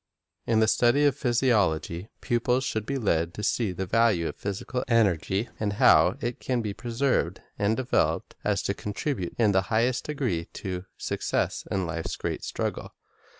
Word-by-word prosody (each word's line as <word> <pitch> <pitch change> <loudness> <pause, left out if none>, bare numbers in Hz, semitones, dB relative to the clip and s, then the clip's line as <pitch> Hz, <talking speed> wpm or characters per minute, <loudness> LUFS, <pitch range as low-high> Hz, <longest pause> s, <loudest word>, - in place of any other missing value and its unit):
In 110 -1 +3
the 110 - +4
study 120 +6 +4
of 140 -3 +3
physiology, 105 - +1
pupils 125 +2 +1
should 110 -4 -2
be 140 - -1
led 85 -8 0
to 105 - -5
see 110 -1 +1
the 95 +1 -3
value 105 -4 +2
of - - -5
physical 100 +6 -3
energy, 105 -2 +2
and 105 -2 -1
how 125 +2 +5
it 120 0 -3
can 125 -3 -1
be 105 - -2
so - - -11
preserved 120 -7 0 0.2
and 105 +2 +2
developed 130 -1 0
as - - 0
to - - 0
contribute 105 - -3
in 110 -3 +4
the 95 -1 +3
highest 115 +3 +1
degree 125 - -2
to 90 -1 -5
success - - -2
in 95 -2 0
life's 85 -1 -3
great - - -4
struggle. - - -4
110 Hz, 170 wpm, -27 LUFS, 95-125 Hz, 0.2 s, how